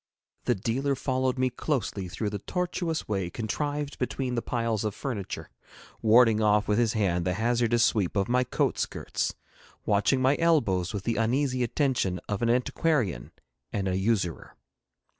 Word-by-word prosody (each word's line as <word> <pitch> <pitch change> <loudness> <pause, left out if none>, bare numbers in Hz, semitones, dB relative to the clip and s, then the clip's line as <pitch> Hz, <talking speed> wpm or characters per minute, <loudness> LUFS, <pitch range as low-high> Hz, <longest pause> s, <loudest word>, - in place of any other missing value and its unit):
The 120 - +2
dealer 130 +8 -1
followed 130 -1 0
me 130 0 +1
closely 115 -9 -2
through 105 +4 -3
the 105 - -3
tortuous 175 - -2
way 95 -4 -1
contrived 145 +7 -3
between 125 0 -2
the 120 - 0
piles 115 -3 -1
of 105 -1 -2
furniture, 110 -9 -5 0.5
warding 115 0 +5
off 105 0 +3
with 105 +2 +2
his 115 -2 +2
hand 90 -5 +1
the 90 0 0
hazardous 120 +1 +2
sweep 105 -5 +1
of 100 0 +1
my 125 +1 +2
coat - - 0
skirts, - - -2 0.5
watching 105 +6 +2
my 130 +2 +3
elbows 115 - +2
with 100 -3 -4
the 115 +1 -1
uneasy 130 +3 +1
attention 120 - 0
of 105 +1 -2
an 115 - +2
antiquarian 125 - 0 0.4
and 100 -2 -2
a 90 - 0
usurer. 95 -4 -1
115 Hz, 160 wpm, -27 LUFS, 105-130 Hz, 0.5 s, warding